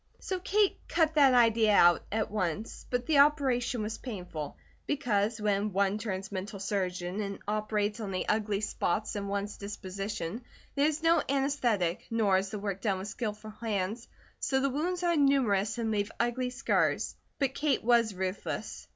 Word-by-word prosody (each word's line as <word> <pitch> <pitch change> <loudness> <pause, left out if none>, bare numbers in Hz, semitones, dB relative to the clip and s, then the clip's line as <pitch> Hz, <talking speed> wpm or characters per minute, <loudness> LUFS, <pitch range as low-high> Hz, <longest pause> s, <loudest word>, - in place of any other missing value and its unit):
So 375 -1 -3
Kate 405 +2 +2
"cut 320 -2 +2
that 275 -4 +6
idea 225 -3 +5
out" 175 -2 +6
at 215 0 -1
once, 205 +1 -3
but 245 0 -1
the 295 0 +3
operation 265 -5 +3
was 215 +1 -4
painful, 180 - -6 0.3
because 225 -6 0
when 205 -1 0
one 200 +2 +1
turns 195 -3 -4
mental 200 +1 -5
surgeon 185 -1 -2
and 200 -1 -4
operates 210 0 -1
on 210 -3 -4
the 185 -1 -2
ugly 210 -1 0
spots 210 0 -1
in 200 -1 -3
one's 200 +1 -3
disposition, 200 0 -5 0.3
there 285 +1 +3
is 310 +1 -2
no 330 +1 +5
anaesthetic, 250 -10 0
nor 210 -5 +3
is 195 0 -4
the 215 - -4
work 200 -1 -4
done 195 -3 +1
with 190 +2 -5
skilful 215 -1 -5
hands, 215 0 -3 0.3
so 265 - +1
the 275 0 +1
wounds 350 +6 -1
are 345 -1 +3
numerous 240 -8 +2
and 225 -2 -1
leave 205 0 -1
ugly 240 +2 0
scars; 250 +1 0 0.2
but 270 -2 0
Kate 285 -2 0
was 230 -3 +3
ruthless. 185 +1 -4
215 Hz, 170 wpm, -30 LUFS, 200-255 Hz, 0.3 s, that